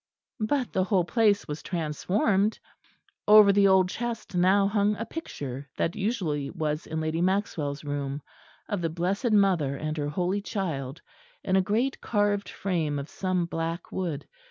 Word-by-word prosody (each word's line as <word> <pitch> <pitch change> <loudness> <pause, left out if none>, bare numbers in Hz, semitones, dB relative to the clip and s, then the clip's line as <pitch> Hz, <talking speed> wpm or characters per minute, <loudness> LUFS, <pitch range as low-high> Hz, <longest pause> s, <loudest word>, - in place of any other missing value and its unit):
But 250 +4 -1
the 185 - +2
whole 190 -3 +2
place 210 0 +2
was 150 +1 -5
transformed. 190 +5 0 0.7
Over 210 -1 +8
the 200 0 +5
old 190 -1 +5
chest 230 +2 -5
now 190 +3 +4
hung 205 0 +2
a 230 - -4
picture, 140 - -6
that 165 - 0
usually 185 - -1
was 155 -1 -3
in 160 0 -3
Lady 155 +1 -1
Maxwell's 175 -7 -1
room, 145 -1 -3 0.4
of 205 -4 -2
the 165 - 0
Blessed 185 +8 -1
Mother 185 -9 +3
and 155 +1 -3
her 145 -1 -1
holy 180 +6 -1
Child, 160 - -4 0.4
in 190 - +1
a 190 - +5
great 225 +8 0
carved 205 -2 0
frame 165 -7 -1
of 140 +1 -5
some 185 -2 -1
black 165 0 -4
wood. 165 -6 -3
185 Hz, 155 wpm, -27 LUFS, 155-205 Hz, 0.7 s, Over